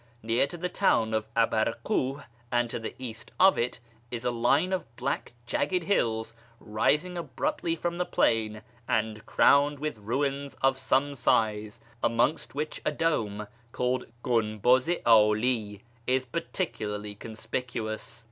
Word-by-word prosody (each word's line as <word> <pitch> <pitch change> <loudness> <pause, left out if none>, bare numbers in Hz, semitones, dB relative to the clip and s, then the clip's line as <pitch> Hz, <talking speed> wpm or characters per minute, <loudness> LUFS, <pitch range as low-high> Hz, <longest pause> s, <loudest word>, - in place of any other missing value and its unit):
Near 115 +4 +2
to 175 - -8
the 180 +2 -2
town 115 - +2
of 110 0 -1
Abarkuh, 115 +4 +1 0.3
and 120 -1 +1
to - - -3
the 115 - -6
east 115 -3 -7
of 190 +1 +6
it, 120 +1 -1 0.3
is 120 0 -5
a 125 - +2
line 135 +10 +2
of 120 -11 -4
black - - -3
jagged 180 +8 0
hills, 115 - 0 0.3
rising 150 +11 0
abruptly 280 - -2
from 170 +1 -3
the 180 - +1
plain, 110 -6 +1 0.2
and 110 -1 0
crowned 145 +1 +4
with 150 -5 -4
ruins 140 +5 -2
of 135 0 +1
some 135 +2 +1
size, 110 -4 +1 0.2
amongst 120 +6 +1
which 150 +1 -3
a - - +1
dome 110 -10 -1 0.3
called 125 +1 -1 0.2
Gunbuz 120 +3 +2
i 175 - +1
'Ali 110 -1 +3 0.2
is 130 +1 +2
particularly 105 - -3
conspicuous. 110 +1 -5
120 Hz, 140 wpm, -28 LUFS, 110-145 Hz, 0.3 s, of